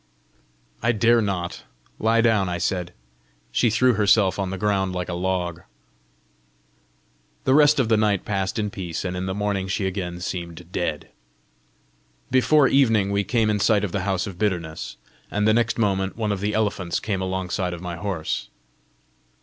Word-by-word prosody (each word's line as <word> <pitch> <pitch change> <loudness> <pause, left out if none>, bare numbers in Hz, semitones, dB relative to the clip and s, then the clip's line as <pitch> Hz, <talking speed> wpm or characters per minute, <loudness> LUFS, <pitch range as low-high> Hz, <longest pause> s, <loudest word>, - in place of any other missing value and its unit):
"I 115 +1 +2
dare 115 +1 +4
not. 90 -4 -3 0.4
Lie 115 +1 +3
down!" 110 -5 +2
I 85 - -2
said. 90 0 -2 0.6
She 120 - +2
threw 125 +3 +3
herself 100 -2 +3
on 95 -1 -1
the 95 - -4
ground 95 -1 0
like 90 0 -3
a - - -2
log. 90 -1 -2 1.8
The 130 - +3
rest 150 0 +5
of 125 - +2
the 110 -1 +3
night 105 -3 +1
passed 95 -1 -2
in 105 -2 -1
peace, 90 -3 -5
and 90 0 -2
in 90 +1 -3
the 95 - -2
morning 100 -2 -1
she 95 +1 -1
again 90 -2 -3
seemed 85 -1 -6
dead. 85 -5 -3 1.2
Before 135 +3 +5
evening 115 -8 +3
we 100 0 +1
came 110 0 +1
in 105 - 0
sight 105 0 +3
of 100 - -2
the 100 - -1
House 95 -1 -1
of 95 -3 -8
Bitterness, 85 -7 -2 0.3
and 105 +1 0
the 110 - +5
next 115 +1 +1
moment 95 -3 0
one 110 -2 -1
of 100 - -2
the 105 +2 -1
elephants 100 -5 0
came 100 -3 -2
alongside 95 -1 -2
of - - -10
my 90 -1 -5
horse. 85 -3 -3
100 Hz, 175 wpm, -23 LUFS, 90-110 Hz, 1.8 s, rest